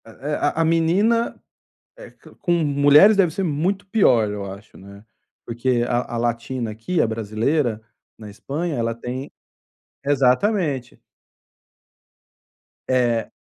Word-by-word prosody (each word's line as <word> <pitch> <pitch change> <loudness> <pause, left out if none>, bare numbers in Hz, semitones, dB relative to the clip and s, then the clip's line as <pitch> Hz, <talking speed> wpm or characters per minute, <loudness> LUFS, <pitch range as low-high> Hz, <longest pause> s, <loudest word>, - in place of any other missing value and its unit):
Eh 115 - -13
eh, 150 +2 -2
a - - +2
a - - +2
menina, 185 +9 +1 0.8
co - - -17
com 175 - -3
mulheres, 150 +5 +5
deve 190 -4 +3
ser 195 - -2
muito 180 +5 -1
pior, 130 - +3
eu 100 -1 -5
acho, 100 +3 -13
né. 100 +2 -14 0.4
Porque 120 +1 -1
a 120 -1 -2
a - - -2
latina 120 0 -2
aqui, 115 +11 -2
a - - +1
brasileira 110 +3 -1 0.4
na 105 -2 -10
Espanha 145 +10 -4
ela 115 -1 -1
tem 125 +4 -6 0.7
exatamente. 140 - 0 1.9
É. 120 -3 0
130 Hz, 125 wpm, -21 LUFS, 115-165 Hz, 1.9 s, mulheres